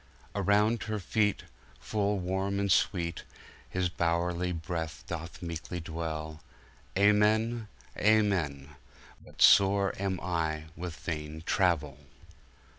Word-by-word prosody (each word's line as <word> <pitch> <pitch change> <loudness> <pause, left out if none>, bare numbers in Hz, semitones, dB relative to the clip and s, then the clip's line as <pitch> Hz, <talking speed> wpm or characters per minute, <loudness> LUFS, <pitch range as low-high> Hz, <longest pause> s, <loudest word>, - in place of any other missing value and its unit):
Around 105 +3 +2
her 110 -1 -2
feetFull 105 0 -2
Warme 95 +2 -1
and 100 -1 0
SweeteHis 90 0 -2
bowerie 85 +1 0
Breath 80 -1 -4
doth 85 +1 -6
meeklie 85 +1 -5
dwell:Amen, 100 +8 -1 0.3
Amen:But 75 - -1
sore 100 0 +6
am 95 -2 -1
I 80 -3 -1
with 85 -1 -6
Vaine 80 -1 -5
Travel! 80 -8 +1
90 Hz, 85 wpm, -30 LUFS, 80-100 Hz, 0.3 s, sore